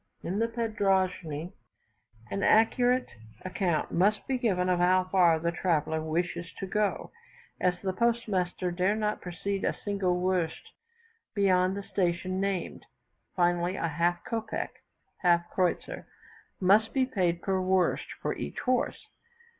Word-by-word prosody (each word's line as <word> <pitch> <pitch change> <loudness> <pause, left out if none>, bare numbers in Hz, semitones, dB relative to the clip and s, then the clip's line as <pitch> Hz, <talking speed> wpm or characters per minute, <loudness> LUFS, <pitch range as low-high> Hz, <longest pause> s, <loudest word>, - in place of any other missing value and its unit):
In 190 +4 -2
the 230 - +2
padroschne 190 -8 -1 0.8
an 200 - -2
accurate 245 +4 +3 0.3
account 180 -3 -1
must 205 +4 +2
be 260 -2 -1
given 185 -6 +1
of 180 -1 +2
how 185 +1 +4
far 180 -3 +4
the 170 +1 -1
traveller 160 -2 0
wishes 170 +1 -2
to - - -6
go, 210 +1 -1 0.5
as 180 -1 +1
the 190 -1 -1
postmaster 195 -6 0
dare 185 +4 +1
not 210 -1 -1
proceed 195 +2 -3
a - - 0
single 190 -3 0
werst 180 -3 -1 0.6
beyond 190 -1 +3
the 200 - -5
station 185 0 -1
named. 195 -2 -2 0.5
Finally, 175 0 +1
a 165 - -1
half 170 +3 0
kopec 225 -1 -3 0.5
(half 175 -1 +3
kreutzer), 180 -2 -1 0.5
must 205 +6 +4
be 265 -1 +3
paid 180 -9 -1
per 190 -1 0
werst 185 -1 +1 0.2
for - - -1
each - - -5
horse. 255 -1 0
185 Hz, 135 wpm, -29 LUFS, 175-205 Hz, 0.8 s, how